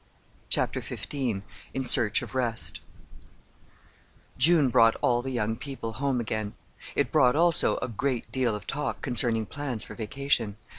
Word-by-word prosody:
CHAPTER - - -1
XV - - -7 0.6
IN 135 - -1
SEARCH 110 -6 +6
OF - - -8
REST 120 -3 -2 1.5
June 145 +1 +5
brought 115 -1 +5
all 120 0 +2
the 135 - -5
young 110 -3 -1
people 125 -3 -6
home 135 +2 -1
again. 110 -2 -3 0.4
It - - 0
brought, 125 +1 +4
also, 170 +1 +3
a - - -1
great 125 +2 -3
deal 125 -4 0
of 105 -1 -8
talk 145 +1 -3
concerning 120 -4 +1
plans 135 -3 -3
for - - -10
vacation. 115 -2 -1
125 Hz, 145 wpm, -27 LUFS, 115-135 Hz, 1.5 s, SEARCH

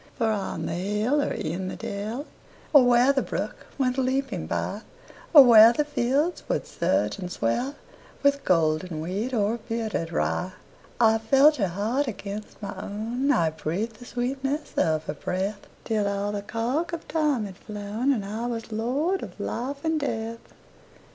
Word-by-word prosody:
For 225 -4 +2
on 195 -6 -3
the - - -2
hill 210 - 0
or - - -1
in 175 +4 -3
the - - -4
dell, 215 +8 -4 0.5
Or 285 -3 +9
where 245 +2 +5
the 270 - +1
brook - - -5
went 260 -1 +1
leaping 260 -7 -1
byOr 205 - -2 0.5
where 235 -7 +10
the 300 +4 0
fields 290 +4 0
would - - 0
surge - - 0
and 180 -2 -5
swellWith 280 - -2
golden 160 -1 +1
wheat 195 +10 -3
or 225 -1 0
bearded 220 -7 -2
rye,I 220 +6 -1
felt 275 +7 +5
her 200 -5 +1
heart 220 +10 -1
against 210 -1 -6
my 200 - -4
own,I 220 - 0
breathed 190 +9 -3
the 245 - -12
sweetness 270 +5 -3
of 155 -1 +1
her 150 - -4
breath, 190 +6 -3 0.2
Till 215 -3 0
all 200 +1 -1
the 205 -1 -3
cark 245 +11 -2
of 335 - -5
time 300 -8 +1
had 190 -2 -9
flown, 210 +6 -2
And 220 -7 -1
I 220 +4 -3
was 230 -2 -5
lord 275 - 0
of - - -9
life 280 +5 -4
and 320 -1 +1
death. 230 -5 -3
225 Hz, 155 wpm, -26 LUFS, 200-270 Hz, 0.5 s, where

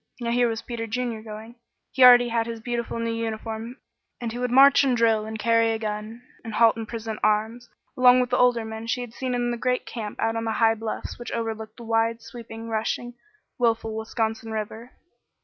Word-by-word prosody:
Now 235 -1 -2
here 245 0 +3
was 225 -1 -3
Peter 230 -1 -5
Junior 235 -1 -3
going. 220 +2 -10 0.3
He 265 - +3
already 245 -1 +8
had 230 0 0
his 230 -1 -5
beautiful 235 0 -3
new 230 0 -2
uniform, 225 +1 -5 0.4
and 235 -2 -4
he 240 - -6
would 250 0 -1
march 275 +3 +7
and 260 -3 +2
drill 225 -2 +2
and 220 0 -5
carry 230 +1 +2
a - - -1
gun, 215 +2 -5 0.2
and 225 -3 -6
halt 230 0 +5
and 225 -1 -6
present 225 -1 -5
arms, 220 +3 0 0.3
along 250 0 +6
with 250 -1 0
the 250 - +2
older 245 -2 +3
men 220 +1 -7
she 250 +1 -1
had 240 -2 -8
seen 255 -1 -3
in 240 0 0
the 240 - -3
great 250 +1 -1
camp 215 -3 -6
out 225 0 0
on 225 0 -2
the 225 - -1
high 225 0 +4
bluffs 225 +1 -5
which 240 - -7
overlooked 220 -1 -4
the 240 - -10
wide, 225 0 0
sweeping, 230 -2 -9
rushing, 225 +2 -2 0.5
willful 225 -2 +1
Wisconsin 220 0 -3
River. 220 +2 -5
230 Hz, 210 wpm, -25 LUFS, 220-240 Hz, 0.5 s, already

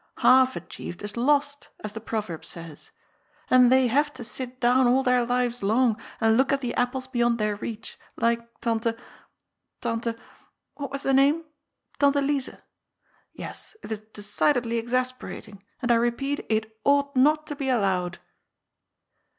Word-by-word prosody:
' - - -30
Half 260 0 +5
achieved 175 - -8
is 205 0 -5
lost/ 285 +3 +1
as 215 -1 -5
the 225 - -6
proverb 210 -7 -4
says. 165 -3 -9 0.6
And 250 -1 +7
they 260 0 +5
have 290 +5 +2
to 255 - -7
sit 255 +2 -5
down 250 +1 +4
all 260 +2 +3
their 250 -1 +3
lives 245 0 0
long 225 +3 +3 0.2
and 225 -1 +4
look 265 +3 +3
at 275 0 +1
the 245 -2 -2
apples 250 +1 -1
beyond 240 -2 +1
their 210 -2 0
reach, 225 +1 -7 0.2
like 235 0 +2 0.2
Tante 230 -1 0 0.4
— - - -55
^Tante 230 -1 -2 0.3
— - - -39
^what 280 -2 -3
was 275 0 -5
the 270 - +1
name? 285 +5 +4 0.3
— - - -38
Tante 285 0 +4
Lize. 275 -1 0 0.8
Yes, - - -8
it - - -8
is 220 - -2
decidedly 230 +3 0
exasperating, 240 -4 -3 0.2
and 240 - +2
I - - +6
repeat, 255 +5 -1
it 220 0 -1
ought 280 0 +2
not 300 +4 +4
to 295 - -5
be 275 -1 -3
allowed." 190 -6 +1
245 Hz, 165 wpm, -26 LUFS, 225-270 Hz, 0.8 s, And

